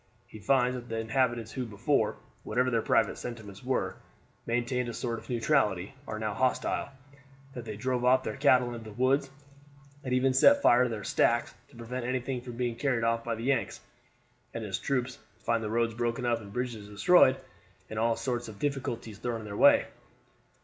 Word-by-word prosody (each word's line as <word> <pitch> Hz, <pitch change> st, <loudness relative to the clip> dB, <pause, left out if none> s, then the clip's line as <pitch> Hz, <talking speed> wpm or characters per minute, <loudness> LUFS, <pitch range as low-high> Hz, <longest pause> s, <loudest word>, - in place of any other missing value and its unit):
He 110 Hz, -, -12 dB
finds 125 Hz, +4 st, +2 dB
that 120 Hz, -1 st, -7 dB
the 115 Hz, -, -3 dB
inhabitants 115 Hz, -1 st, 0 dB
who 130 Hz, -, -3 dB
before, 110 Hz, +2 st, 0 dB, 0.3 s
whatever 125 Hz, +3 st, 0 dB
their 115 Hz, -2 st, +2 dB
private -, -, +1 dB
sentiments 110 Hz, -4 st, -8 dB
were, 130 Hz, 0 st, -1 dB, 0.5 s
maintained 120 Hz, +1 st, -1 dB
a 115 Hz, -, -6 dB
sort 115 Hz, -2 st, -3 dB
of 110 Hz, -, -17 dB
neutrality, 115 Hz, -6 st, +1 dB
are 110 Hz, -, -4 dB
now 110 Hz, -1 st, -2 dB
hostile, 130 Hz, +5 st, 0 dB, 0.6 s
that 120 Hz, -2 st, -7 dB
they 105 Hz, -2 st, -6 dB
drive 125 Hz, +2 st, -1 dB
off 130 Hz, +1 st, +4 dB
their -, -, -4 dB
cattle 130 Hz, -3 st, +3 dB
into 115 Hz, -1 st, -7 dB
the 105 Hz, -, -12 dB
woods, 135 Hz, +2 st, +2 dB, 0.7 s
and 130 Hz, -, -4 dB
even 130 Hz, +1 st, +3 dB
set 280 Hz, -, +6 dB
fire 125 Hz, +1 st, +6 dB
to -, -, -1 dB
their 110 Hz, -3 st, -5 dB
stacks, 120 Hz, +4 st, +1 dB, 0.2 s
to 140 Hz, -, -19 dB
prevent 120 Hz, +2 st, -5 dB
anything 125 Hz, 0 st, -2 dB
from 120 Hz, -1 st, -9 dB
being 120 Hz, -2 st, -2 dB
carried 125 Hz, -3 st, 0 dB
off 115 Hz, 0 st, +1 dB
by 115 Hz, -1 st, -2 dB
the 115 Hz, -, -7 dB
Yanks; 130 Hz, -2 st, 0 dB, 0.8 s
and 115 Hz, -, -3 dB
his 95 Hz, -3 st, -3 dB
troops 130 Hz, -2 st, -2 dB, 0.2 s
find 115 Hz, 0 st, -1 dB
the 105 Hz, -, -3 dB
roads 115 Hz, +1 st, +1 dB
broken 120 Hz, +2 st, -2 dB
up 120 Hz, -1 st, +1 dB
and 100 Hz, -2 st, -11 dB
bridges 120 Hz, -3 st, -4 dB
destroyed 130 Hz, -, +5 dB, 0.5 s
and 110 Hz, -, -5 dB
all 115 Hz, 0 st, +2 dB
sorts 120 Hz, -1 st, -3 dB
of 110 Hz, -2 st, -10 dB
difficulties 120 Hz, -6 st, -3 dB
thrown 120 Hz, -2 st, -3 dB
in -, -, -9 dB
their 100 Hz, -1 st, -6 dB
way." -, -, +6 dB
120 Hz, 190 wpm, -29 LUFS, 115-130 Hz, 0.8 s, set